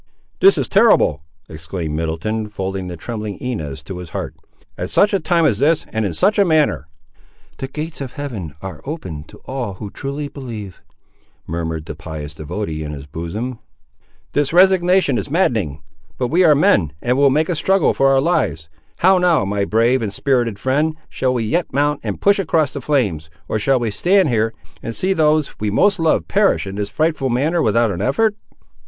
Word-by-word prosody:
"This 390 +1 +6
is - - 0
terrible!" 200 - +4 0.3
exclaimed 80 0 -5
Middleton, 95 +8 -2
folding 95 -2 -4
the 90 -1 -6
trembling 105 +1 -5
Inez 90 - -5
to 90 -2 -7
his 90 -2 -8
heart. - - -5 0.4
"At - - -4
such 205 +1 +3
a 195 - +3
time 170 0 +2
as 115 -8 +2
this, 155 +3 +2
and 110 - 0
in 90 - -4
such 205 +3 +2
a - - +7
manner!" 155 - +2 0.7
"The 135 - -3
gates 155 +3 -6
of 130 -2 -6
Heaven 105 - -6
are 95 - -7
open 90 - -6
to - - -15
all 125 -7 -4
who 100 +1 -8
truly 140 +2 -4
believe," 115 - -8 0.6
murmured 80 -1 -4
the 75 - -6
pious 80 -1 -7
devotee 80 +1 -4
in 75 0 -5
his 70 -1 -8
bosom. 90 - -5 0.7
"This 145 -1 +1
resignation 180 -5 +4
is - - -5
maddening! 110 - 0 0.3
But 125 -2 -1
we 175 +5 +3
are 155 -4 +6
men, 85 - +3
and 125 +7 0
will 140 +1 +5
make 155 +4 +2
a 175 - -1
struggle 190 +4 +2
for 135 - +2
our 135 0 +4
lives! 80 - 0 0.3
how 185 +1 +5
now, 175 - +3
my 100 0 -1
brave 115 +5 +2
and 105 -3 -2
spirited 120 -1 0
friend, 150 +7 0
shall 130 -1 -1
we 120 - 0
yet 165 +11 -1
mount 145 +2 +1
and - - -4
push 200 0 +3
across 160 -6 +1
the 140 - -6
flames, 105 - 0 0.2
or 110 - -1
shall 135 +5 +3
we 115 -3 -1
stand 180 - +3
here, 110 -1 0 0.3
and 115 - -5
see 190 +1 +2
those 155 -3 +1
we 105 - -1
most 200 - +3
love 165 -1 +1
perish 200 - +2
in 95 - -6
this 100 -1 -2
frightful 155 -4 0
manner, 150 +8 +1
without 115 0 +2
an 90 -1 -4
effort?" 205 - +1
125 Hz, 190 wpm, -19 LUFS, 95-155 Hz, 0.7 s, a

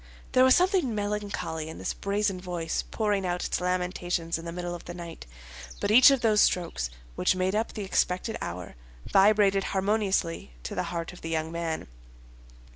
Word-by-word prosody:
There 255 - +5
was 260 0 +7
something 360 - +2
melancholy 205 -6 -3
in 160 - -8
this - - -3
brazen 200 -2 -1
voice 175 -3 -2
pouring 210 -3 0
out 180 -1 -1
its - - -1
lamentations 180 -2 -1
in 165 - -9
the 170 - -4
middle 175 0 -4
of 175 - -8
the 175 - -7
night; 170 - -9 0.5
but - - 0
each 250 +5 +9
of 275 -3 +2
those 215 -3 +4
strokes, 165 - +1 0.2
which 125 - +2
made 185 +1 0
up 220 +2 -1
the 210 - -4
expected 190 +3 0
hour, 90 0 -5 0.3
vibrated 195 -1 +4
harmoniously 190 - 0
to 65 - -5
the - - -1
heart 170 0 -4
of 180 - -13
the 165 - -5
young 160 0 -1
man. 165 -1 -3
185 Hz, 180 wpm, -27 LUFS, 170-210 Hz, 0.5 s, each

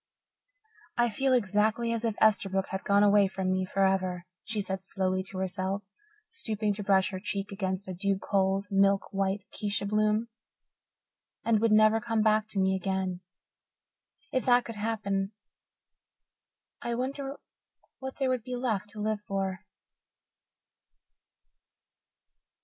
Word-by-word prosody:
"I 240 0 +3
feel 265 +5 +1
exactly 220 0 +2
as 230 0 -3
if 225 -2 0
Esterbrook 195 -3 +2
had 190 0 -4
gone 200 0 +4
away 205 -1 +5
from 190 -1 -2
me 185 0 +1
forever," 185 -2 +1 0.2
she 215 0 -3
said 190 -1 -2
slowly 185 -1 -1
to 190 - -7
herself, 190 +1 -2 0.4
stooping 215 - -1
to 205 +1 -5
brush 195 -1 +3
her 185 - -4
cheek 195 +1 -3
against 190 -1 -3
a 185 - -4
dew 195 +2 0
cold, 195 0 +1
milk 195 0 +3
white 195 0 0
acacia 205 0 -2
bloom, 215 +2 +1 1.2
"and 230 -2 +3
would 225 0 +2
never 215 +1 +5
come 225 -1 0
back 215 0 +3
to 210 -2 -2
me 190 0 +3
again. 190 -1 -2 1.1
If 260 - +1
that 245 -1 +5
could 230 - -5
happen, 205 -2 -2 1.5
I 235 - -2
wonder 270 +3 -3 0.6
what 265 0 -6
there 270 -2 +1
would 255 -3 0
be 250 +1 -4
left 220 -5 -1
to 215 - -10
live 215 0 -1
for?" 195 -1 -3
205 Hz, 140 wpm, -29 LUFS, 190-220 Hz, 1.5 s, away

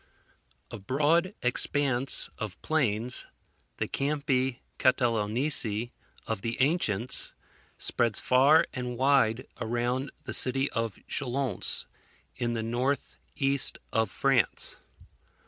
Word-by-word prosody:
A - - -6
broad 150 - +2
expanse 130 +1 +2
of 105 -4 -5
plains, 125 -6 0 0.5
the - - -1
Campi 135 -3 0 0.2
Catalaunici 120 -1 +1 0.3
of - - -3
the 115 +4 -3
ancients, 130 - +1 0.4
spreads 115 -3 +1
far 140 +5 +5
and 125 -1 -4
wide 130 -3 +3
around 120 +4 -1
the - - -5
city 135 +2 +1
of 115 -3 -2
Chalons, 130 -5 -2 0.5
in 120 -1 -1
the 110 - -2
north 125 +5 -1 0.2
east 135 -1 +1 0.2
of 110 -2 +2
France. 135 -3 +1
125 Hz, 100 wpm, -29 LUFS, 115-140 Hz, 0.5 s, far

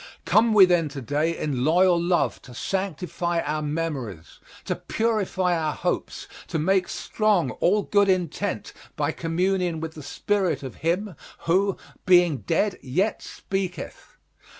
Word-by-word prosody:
Come 220 0 +4
we 195 -3 +9
then 175 -4 +2
to - - -4
day 150 +6 0
in 135 -5 -2
loyal 175 +3 +4
love 170 -7 +1
to 125 - -13
sanctify 175 +1 -2
our 155 +1 -2
memories, 145 - -4 0.3
to - - -1
purify 200 -5 0
our 155 -2 -1
hopes, - - -3 0.2
to - - -2
make 185 +4 +2
strong 205 - +1
all 205 +3 +3
good 200 0 +3
intent 180 -4 -1 0.2
by - - 0
communion 175 0 -1
with 160 0 -5
the 155 - -9
spirit 180 -1 -1
of 130 - -7
him 180 +3 -1 0.3
who, 190 +3 +2 0.3
being 175 -5 +5
dead 180 +7 0
yet 185 +12 -1
speaketh. 185 -6 -5
175 Hz, 140 wpm, -25 LUFS, 155-190 Hz, 0.3 s, we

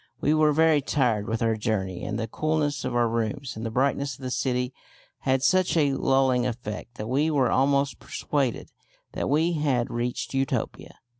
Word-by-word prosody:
We 150 - +2
were 155 -1 +4
very 160 0 +4
tired 120 -7 0
with 115 +1 -1
our 115 -1 +2
journey, 95 -4 -2
and 105 - -3
the 115 -1 -2
coolness 150 +2 -1
of 130 -1 -3
our 120 -1 +3
rooms 115 +4 -2
and 110 - -6
the 115 - -2
brightness 135 +2 0
of 135 - -14
the 130 - -3
city 125 0 -1 0.5
had 130 0 +1
such 185 0 +3
a 145 -3 +3
lulling 135 -2 +2
effect 115 -1 -6
that 105 - -5
we 140 +7 +1
were 140 -5 +2
almost 140 +1 +2
persuaded 135 -5 -2 0.4
that - - -3
we 160 +4 +2
had 140 -6 0
reached 120 +2 -3
Utopia. 135 -1 -2
130 Hz, 180 wpm, -26 LUFS, 115-145 Hz, 0.5 s, were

